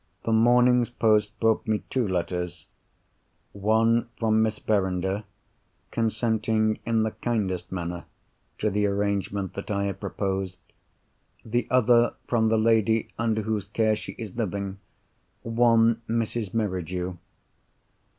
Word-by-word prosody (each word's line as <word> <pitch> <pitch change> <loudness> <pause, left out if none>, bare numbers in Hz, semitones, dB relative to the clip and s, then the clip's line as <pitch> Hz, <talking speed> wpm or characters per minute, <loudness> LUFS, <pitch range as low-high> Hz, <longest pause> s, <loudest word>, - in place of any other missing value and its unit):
The 115 - -1
morning's 120 +2 +4
post 110 -2 +1
brought 115 -1 +2
me 110 -1 0
two 125 -4 +1
letters. 90 -3 -3 0.9
One 115 +3 +2
from 110 -1 +2
Miss 110 -1 +1
Verinder, 95 0 -1 0.7
consenting, 110 -1 0
in 115 -1 +2
the 110 - -1
kindest 95 -7 -2
manner, 85 -1 -4 0.5
to 105 - 0
the 105 +1 +1
arrangement 100 -1 -1
that 100 - -7
I 100 -1 0
have 100 -1 -3
proposed. 95 -2 -3 0.9
The 120 +2 -1
other 120 -1 +4
from 115 -2 +2
the 110 0 +3
lady 110 0 +2
under 110 -2 0
whose 105 -2 -2
care 110 +1 +1
she - - -7
is 110 -5 -8
living—one 115 +3 -1
Mrs. 115 -2 -1
Merridew. 90 -4 -2
110 Hz, 120 wpm, -26 LUFS, 100-115 Hz, 0.9 s, morning's